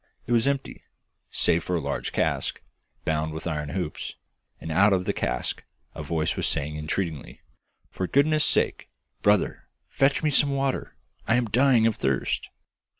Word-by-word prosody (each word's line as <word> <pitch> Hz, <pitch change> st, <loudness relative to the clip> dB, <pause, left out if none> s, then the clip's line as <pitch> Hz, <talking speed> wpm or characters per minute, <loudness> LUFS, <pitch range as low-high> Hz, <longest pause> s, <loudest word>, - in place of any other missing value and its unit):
It -, -, -6 dB
was 115 Hz, +1 st, +3 dB
empty, 140 Hz, -1 st, -2 dB, 0.5 s
save 85 Hz, -, +2 dB
for 90 Hz, -, -1 dB
a -, -, +1 dB
large 75 Hz, -, -3 dB
cask, -, -, -1 dB, 0.5 s
bound 80 Hz, 0 st, 0 dB
with 80 Hz, -, -6 dB
iron 75 Hz, -3 st, -2 dB
hoops, 90 Hz, -3 st, -4 dB, 0.4 s
and 80 Hz, -, -6 dB
out 100 Hz, +5 st, +5 dB
of 90 Hz, -1 st, +1 dB
the -, -, 0 dB
cask -, -, -2 dB, 0.3 s
a -, -, -7 dB
voice 80 Hz, +1 st, -1 dB
was -, -, 0 dB
saying 75 Hz, +2 st, -1 dB
entreatingly, 75 Hz, 0 st, -4 dB, 0.5 s
'For 95 Hz, -, -3 dB
goodness' 150 Hz, -, +3 dB
sake, -, -, +1 dB, 0.3 s
brother, 105 Hz, -1 st, +2 dB, 0.2 s
fetch 135 Hz, +3 st, +2 dB
me 155 Hz, -, +2 dB
some 140 Hz, 0 st, +3 dB
water; 135 Hz, -1 st, -2 dB, 0.3 s
I 115 Hz, -, +4 dB
am 125 Hz, -1 st, +2 dB
dying 125 Hz, -1 st, +4 dB
of 115 Hz, -2 st, +2 dB
thirst! 65 Hz, -2 st, -1 dB
95 Hz, 160 wpm, -26 LUFS, -, 0.5 s, out